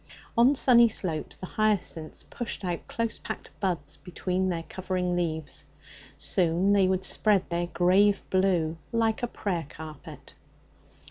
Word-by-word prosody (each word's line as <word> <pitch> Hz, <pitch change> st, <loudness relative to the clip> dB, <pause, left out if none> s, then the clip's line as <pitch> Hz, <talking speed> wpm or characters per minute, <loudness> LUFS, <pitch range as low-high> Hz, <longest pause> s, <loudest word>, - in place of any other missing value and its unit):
On 245 Hz, +5 st, +5 dB
sunny 240 Hz, -3 st, +6 dB
slopes 165 Hz, -7 st, -2 dB
the -, -, -7 dB
hyacinths 195 Hz, -6 st, -1 dB
pushed 230 Hz, -4 st, -5 dB
out 175 Hz, -2 st, -3 dB
close 230 Hz, -1 st, -2 dB
packed 220 Hz, -, -7 dB
buds 170 Hz, -7 st, -2 dB
between 185 Hz, +1 st, -2 dB
their 170 Hz, -2 st, -2 dB
covering 180 Hz, 0 st, -2 dB
leaves; 160 Hz, -4 st, -2 dB, 0.5 s
soon 180 Hz, +2 st, +2 dB
they 195 Hz, -2 st, +4 dB
would 190 Hz, 0 st, +1 dB
spread 205 Hz, -2 st, +3 dB
their 175 Hz, 0 st, 0 dB
grave 190 Hz, +4 st, +3 dB
blue 175 Hz, -4 st, +1 dB
like 225 Hz, -1 st, +1 dB
a 240 Hz, -, 0 dB
prayer 175 Hz, -9 st, -3 dB
carpet. 155 Hz, -2 st, -10 dB
185 Hz, 135 wpm, -27 LUFS, 170-205 Hz, 0.5 s, sunny